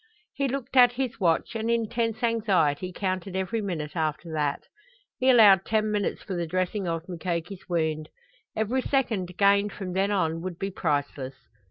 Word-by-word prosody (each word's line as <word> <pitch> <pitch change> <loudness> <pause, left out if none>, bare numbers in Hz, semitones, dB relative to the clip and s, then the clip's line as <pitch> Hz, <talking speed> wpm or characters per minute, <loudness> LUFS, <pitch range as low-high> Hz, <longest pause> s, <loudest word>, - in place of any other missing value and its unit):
He 275 0 0
looked 270 0 -4
at 245 -1 +7
his 250 -2 -3
watch 170 +1 +1
and 225 +1 -2
in 230 -1 +1
tense 230 0 -2
anxiety 190 -8 +1
counted 185 0 -3
every 190 +4 -1
minute 165 -7 -4
after 160 0 -2
that. 150 -2 -1 0.6
He 260 - +3
allowed 205 -7 +7
ten 215 0 0
minutes 205 -1 -1
for 195 - -5
the 170 -2 -2
dressing 185 +3 -1
of 165 0 -3
Mukoki's 175 +1 -4
wound. 160 -3 -1 0.5
Every 225 +5 0
second 220 -11 -1
gained 200 0 +4
from 185 -3 -5
then 195 +2 +1
on 165 -5 0
would 180 -1 -5
be 195 +2 -3
priceless. 145 -6 -2
190 Hz, 170 wpm, -26 LUFS, 165-220 Hz, 0.6 s, at